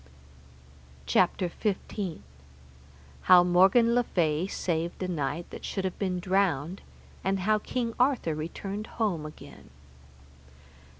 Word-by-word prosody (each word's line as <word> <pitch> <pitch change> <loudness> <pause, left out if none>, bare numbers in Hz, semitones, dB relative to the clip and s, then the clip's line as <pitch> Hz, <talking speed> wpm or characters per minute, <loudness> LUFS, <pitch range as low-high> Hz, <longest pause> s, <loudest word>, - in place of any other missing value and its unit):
CHAPTER 120 - +2
XV. 195 -1 -3 1.1
How 180 -1 +9
Morgan 190 +7 +5
le 245 0 +3
Fay 165 -4 0
saved 170 -1 -2
a - - -1
knight 165 -1 -3
that - - -9
should 195 -2 -3
have 185 - -4
been 185 -3 -1
drowned, 185 -3 0 0.4
and 195 0 0
how 215 +3 +2
King 235 +1 -3
Arthur 250 - +2
returned 195 +7 -5
home 185 -9 0
again. 155 - -13
185 Hz, 115 wpm, -28 LUFS, 170-205 Hz, 1.1 s, How